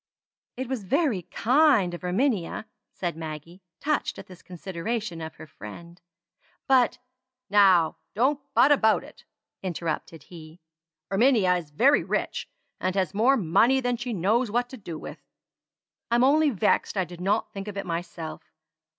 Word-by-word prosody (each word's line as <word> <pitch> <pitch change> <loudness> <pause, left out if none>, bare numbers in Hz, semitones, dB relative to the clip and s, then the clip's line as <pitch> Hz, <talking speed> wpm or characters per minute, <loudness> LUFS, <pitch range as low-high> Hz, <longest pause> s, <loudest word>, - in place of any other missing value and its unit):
"It 260 0 -3
was 255 -4 -3
very 260 - +1
kind 250 - +3
of 175 - -6
Erminia," 200 +1 0 0.3
said 175 -3 -4
Maggie, 160 +3 -8 0.2
touched 300 +1 -1
at - - -9
this 185 -2 -14
consideration 185 +1 -5
of 160 0 -7
her 155 - -11
friend; 170 - -11 0.6
"but..." 255 -3 +3 0.5
"Now 190 -5 +5 0.2
don't 270 +6 +2
'but' 285 - +6
about 220 -6 +4
it," - - -16 0.4
interrupted 165 -3 -4
he. 160 -1 -13 0.5
"Erminia 205 -3 +4
is 165 -4 -7
very 260 - +4
rich, - - -2 0.3
and 185 0 -1
has 190 0 0
more 245 +7 +4
money 230 +8 +3
than 245 -1 0
she 240 +1 -5
knows 220 +5 +1
what 245 +3 0
to 260 - -9
do 175 -7 -7
with. - - -9 0.9
I'm 240 +1 +3
only 300 +3 +4
vexed 210 -2 +1
I 190 - +1
did 175 0 -11
not 205 +4 0
think 195 +1 -6
of 205 -1 -6
it 195 - -3
myself. 170 -2 -5
195 Hz, 150 wpm, -26 LUFS, 170-245 Hz, 0.9 s, but